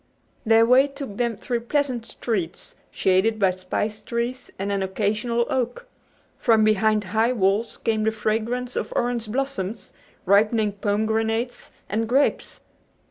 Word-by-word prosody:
Their 225 0 +6
way 255 +4 +5
took 275 -7 -8
them 235 -3 0
through 240 +3 -2
pleasant 250 -1 -1
streets 190 -8 -4 0.2
shaded 190 +4 +2
by 195 -3 +3
spice 210 +4 -3
trees 235 +3 -3
and 200 +1 -2
an 200 -1 0
occasional 215 +5 0
oak. 260 - -2 0.5
From 225 -2 +4
behind 215 0 +3
high 220 +6 +1
walls 205 +1 +1
came 220 -2 0
the 220 - +3
fragrance 225 +3 -2
of - - -3
orange 240 -3 -1
blossoms, 235 -5 -3 0.3
ripening 210 +2 +3
pomegranates 220 +4 -1 0.2
and 225 +2 -1
grapes. 275 +4 +1
225 Hz, 135 wpm, -24 LUFS, 210-240 Hz, 0.5 s, Their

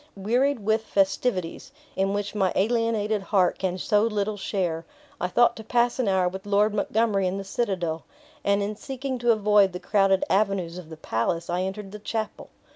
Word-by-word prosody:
Wearied 240 +6 +1
with 220 +1 +2
festivities, 195 0 -1 0.2
in 195 +1 +1
which 205 0 -2
my 195 -4 +1
alienated 220 -1 +1
heart 195 -2 +1
can 185 -1 -1
so 205 +3 +2
little 210 -1 0
share, 180 -5 -2 0.4
I 180 - 0
thought 240 +5 +3
to 220 - -8
pass 240 +2 +1
an 250 - +1
hour 190 -2 +2
with 190 +2 -6
Lord 205 +1 +3
Montgomery 210 -1 +1
in 185 +2 -2
the 195 - -4
citadel; 185 -6 -2 0.4
and 200 0 +2
in 210 +1 -3
seeking 265 +2 -5
to 240 0 +3
avoid 210 -3 +4
the 180 - -5
crowded 195 -2 +2
avenues 190 -4 0
of 165 -3 -12
the 160 - -9
palace, 165 +5 -2
I 175 +1 0
entered 195 +1 -4
the 210 - -8
chapel. 215 0 -4
200 Hz, 185 wpm, -25 LUFS, 190-220 Hz, 0.4 s, avoid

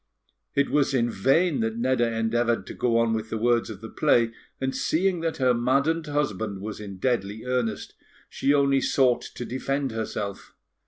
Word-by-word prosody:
It 140 0 +2
was 140 -2 +2
in 120 -2 +1
vain 135 - +2
that 115 0 -1
Nedda 120 -1 +1
endeavoured 115 +1 +1
to - - -8
go 115 -2 +1
on 115 -1 +2
with 110 0 -3
the 110 - -2
words 120 +1 +2
of 105 -2 -8
the 110 - -8
play; 120 -5 +2 0.3
and, 130 0 -2
seeing 180 +2 +1
that 165 -1 -2
her 130 -2 +3
maddened 140 +7 +1
husband 110 -9 -2
was 105 +2 -6
in 100 -2 -8
deadly 110 -1 -1
earnest, 125 -3 -2 0.3
she 140 - 0
only 140 -1 +3
sought 125 -3 +3
to 120 - -7
defend 135 +3 -2
herself. 105 -3 -5
120 Hz, 175 wpm, -25 LUFS, 110-135 Hz, 0.3 s, her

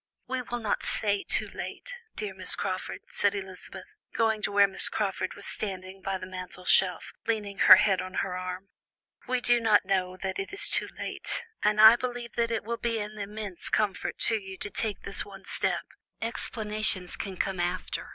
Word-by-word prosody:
"We 260 0 -2
will 240 0 -4
not 220 -3 -1
say 205 -2 0
too - - +1
late, - - -7 0.2
dear 210 -2 -4
Miss - - 0
Crawford," 185 -1 -3
said 205 0 +1
Elizabeth, 190 -2 -6 0.3
going 220 -1 +2
up - - -1
to - - -2
where 200 0 +6
Miss 190 - +2
Crawford 195 -3 -2
was - - -7
standing 190 -2 -2
by 195 0 -2
the 185 - -7
mantelshelf, 185 0 +1
leaning 205 -3 -2
her - - +11
head 195 -1 +3
on 185 0 -7
her 185 -2 -1
arm. 185 +1 -5 0.6
"We 255 0 0
do 240 0 +4
not 215 -3 +4
know 185 -1 0
that 190 +1 -3
it 390 +1 -4
is 400 - +5
too - - 0
late, 485 - -3 0.2
and 210 0 +2
I 220 +2 +10
believe 245 -1 -4
that 230 0 +1
it 225 -2 -1
will 235 +2 -3
be 230 -1 -1
an 210 0 -6
immense 205 -2 -3
comfort 210 -3 0
to 225 -1 +4
you 190 -1 -9
to 205 - -4
take 215 -3 -2
this 200 - 0
one 195 -1 -12
step. - - -1 0.3
Explanations 215 -5 0
can 190 -2 -5
come 190 0 -1
after. 175 +1 -2
200 Hz, 190 wpm, -28 LUFS, 190-225 Hz, 0.6 s, her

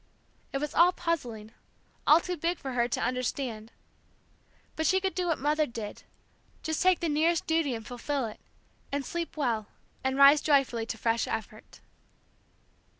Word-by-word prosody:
It - - -1
was 295 +1 -3
all 345 +2 +6
puzzling, 240 -12 -3 0.6
all 305 - +8
too 360 +1 -4
big 340 +2 -1
for 270 - -6
her 240 -1 +2
to 240 - -2
understand. 250 -3 -2 1.0
But 315 - 0
she 380 - +4
could 380 0 -1
do 360 -1 -1
what 330 - +1
Mother 300 +2 +1
did, 225 -3 -7 0.6
just 315 -1 -1
take 370 -2 +4
the 340 - 0
nearest 320 +2 +2
duty 320 -6 +1
and 225 -1 -8
fulfil 255 +3 -3
it, 215 - -8 0.5
and 280 -1 -2
sleep 340 -2 -4
well, 230 -7 0 0.4
and 265 0 0
rise 280 +1 +8
joyfully 270 -6 +2
to 225 - -4
fresh 230 +1 0
effort. 220 -1 -6
280 Hz, 160 wpm, -29 LUFS, 235-325 Hz, 1.0 s, all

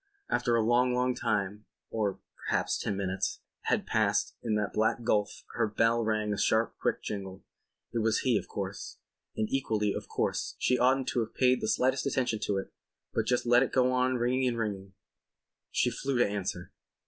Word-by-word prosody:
After 120 -2 +2
a 115 - +3
long 125 +2 +3
long 125 0 +2
time 105 -3 -1 0.3
(or 105 -4 -1 0.2
perhaps - - -1
ten 100 - -2
minutes) 95 -1 -2 0.2
had - - +1
passed - - +1
in 110 -3 0
that 105 -1 -1
black 110 +2 +1
gulf 105 -3 0
her - - +1
bell 115 +2 +2
rang 110 -1 0
a 100 - -3
sharp 110 +1 +2
quick - - -1
jingle. 95 -2 -5 0.5
It 120 - 0
was 110 0 +2
he, 125 -3 +2
of 100 - -1
course. - - -5 0.4
And 110 - +1
equally, 110 -6 +1
of - - -5
course, - - -1
she 125 - +2
oughtn't 130 +1 +3
to 125 - 0
have 115 -1 -3
paid 130 -1 +3
the - - -1
slightest 130 +4 +1
attention 125 -5 0
to 100 - 0
it 95 - -5 0.4
but 110 -1 0
just 125 -1 +1
let 120 +1 +5
it 135 - +1
go 130 -1 +3
on 130 0 +2
ringing 125 +2 +1
and 120 -2 -1
ringing. 100 -4 -3 0.8
She 125 - +1
flew 135 +2 -2
to 120 - +4
answer. 95 -3 -4
115 Hz, 190 wpm, -30 LUFS, 105-125 Hz, 0.8 s, let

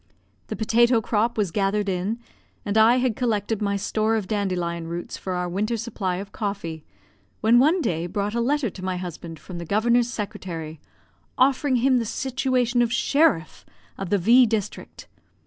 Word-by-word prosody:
The - - -4
potato 235 +2 +3
crop 225 +2 0
was 200 -5 0
gathered 200 +2 0
in, 190 +4 -1 0.5
and 205 0 -2
I 220 +2 +6
had 250 -3 +1
collected 220 -3 -1
my 200 -1 0
store 215 +2 0
of 210 -4 -2
dandelion 180 -5 -2
roots 170 +1 -5
for 185 - -5
our 180 0 -2
winter 210 +6 -1
supply 205 -5 -3
of 195 +2 -7
coffee, 195 -7 -4 0.6
when 230 +2 +5
one 320 +8 +4
day 170 - -1
brought 200 +3 -2
a 235 - 0
letter 270 -2 0
to 185 - -10
my 185 -1 -2
husband 170 -2 -7
from 175 +1 -9
the - - -5
Governor's 235 +6 +2
secretary, 170 -8 -6 0.6
offering 265 +1 +3
him 255 +1 +3
the 230 - -2
situation 250 0 0
of 235 -1 +1
sheriff 275 - +1 0.3
of 195 -2 -5
the 205 - +3
V 235 +7 +5
district. 215 -3 -4
210 Hz, 170 wpm, -24 LUFS, 185-235 Hz, 0.6 s, I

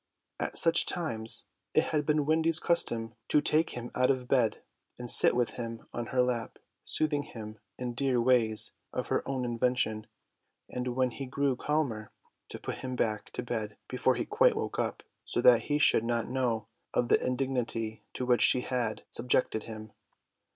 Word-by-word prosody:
At - - -2
such 165 0 +4
times 115 -11 +1 0.3
it - - +5
had 150 -2 0
been 150 -1 +2
Wendy's 160 +1 +3
custom 115 -10 +1
to 150 - +4
take 155 +2 +2
him 120 0 -6
out 125 0 +2
of 130 -2 0
bed 125 -4 +1 0.3
and 120 -1 -3
sit - - +6
with 120 -1 +1
him 115 -2 -6
on 120 -1 -4
her 125 -1 +2
lap, 120 -2 -2 0.3
soothing 150 -2 0
him 110 -7 -9 0.2
in 125 -1 -4
dear 130 0 0
ways 115 -3 +3 0.2
of - - -4
her - - +1
own 130 -2 -2
invention, 120 -2 -1 0.6
and 125 0 -4
when 130 -1 +1
he 135 +2 -6
grew 140 0 0
calmer 125 -7 -2 0.4
to - - -6
put - - -5
him 130 -1 -4
back 110 -3 -1
to - - -4
bed 110 -3 -4
before 130 0 +1
he - - -2
quite 470 +2 +3
woke 445 - -3
up, - - -2 0.2
so - - -2
that - - +5
he 145 - +1
should 145 -6 +4
not 115 -1 -1
know 120 -4 -1 0.3
of 120 - +1
the - - +3
indignity 125 -4 -2
to 125 - -3
which 125 -1 +3
she 125 - +7
had 120 -4 -2
subjected 120 -2 0
him. 110 -1 -9
125 Hz, 180 wpm, -30 LUFS, 115-140 Hz, 0.6 s, she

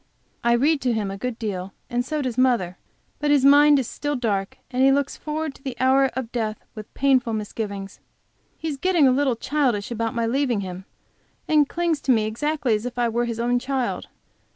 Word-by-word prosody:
I 235 0 +3
read 280 +5 +2
to 250 -2 +1
him 210 -3 -2
a 195 - -6
good 250 0 -3
deal, 195 -4 -4
and 245 0 -1
so 300 +3 -2
does 250 -3 -2
mother, 240 -9 +1 0.4
but 295 - 0
his 285 -2 +4
mind 290 +1 +7
is 260 -4 -1
still 290 0 -3
dark, 205 -6 -2
and 255 +1 +1
he 270 - +6
looks 280 0 0
forward 310 -1 -4
to - - -19
the 260 -4 -5
hour 265 +1 +4
of 255 -3 -4
death 220 -3 -3
with 215 -2 -10
painful 260 -4 +2
misgivings. 205 -2 -5 0.6
He 325 - -5
is 295 -3 -3
getting 345 -2 +3
a - - +5
little 265 -1 +2
childish 245 -5 -1
about 230 +1 -2
my 230 -1 0
leaving 245 -2 0
him, 185 0 -7 0.6
and 300 -2 +3
clings 335 -3 -1
to 265 - +1
me 220 -3 +3
exactly 260 +3 -1
as 215 +3 -1
if 245 - -8
I 240 -1 +2
were 240 +1 0
his 230 -1 -4
own 245 +1 +1
child. 260 -1 -2
250 Hz, 210 wpm, -23 LUFS, 225-280 Hz, 0.6 s, mind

